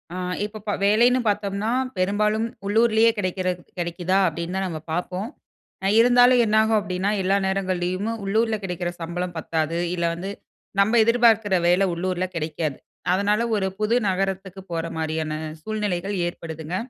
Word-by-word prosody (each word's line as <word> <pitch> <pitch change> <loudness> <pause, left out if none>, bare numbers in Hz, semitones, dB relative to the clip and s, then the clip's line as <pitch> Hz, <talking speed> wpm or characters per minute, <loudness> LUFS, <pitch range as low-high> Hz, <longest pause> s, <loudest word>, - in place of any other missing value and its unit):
ஆ, - - -4 0.3
இப்ப 215 0 -6
ப 205 - +1
வேலைன்னு 235 +5 +4
பாத்தோம்ன்னா, 205 +1 -1 0.3
பெரும்பாலும் 210 +4 +1 0.2
உள்ளூரிலேயே 225 +1 +4
கிடைக்கிற, 185 -1 -2 0.3
கிடைக்குதா! 175 +2 0
அப்டீன்னு 170 +2 -4
தான் 190 - -1
நம்ம 165 -3 -5
பாப்போம். 180 +4 -2 0.6
அ, - - +1
இருந்தாலும் 245 +1 +6
என்னாகும் 220 +1 +3
அப்டீன்னா 190 -1 -2
எல்லா 190 +2 +2
நேரங்கள்லயுமே 190 +2 -1
உள்ளூர்ல 220 +3 +1
கிடைக்கிற 180 -2 -3
சம்பளம் 175 +1 -4
பத்தாது. 160 0 -1 0.2
இல்ல, 170 -1 -1
வந்து 190 +4 -5 0.5
நம்ப 200 +4 +4
எதிர்பாக்குற 225 -3 +4
வேலை 180 +3 +4
உள்ளூர்ல 185 +1 -1
கிடைக்காது. 155 -3 -2 0.4
அதனால 205 +3 +2
ஒரு 195 -2 0
புது 215 +2 +2
நகரத்துக்கு 190 0 -2
போற 165 0 -2
மாரியான 160 -1 -2 0.3
சூழ்நிலைகள் 205 -2 -2
ஏற்படுதுங்க. 160 -1 -6
190 Hz, 135 wpm, -23 LUFS, 175-215 Hz, 0.6 s, இருந்தாலும்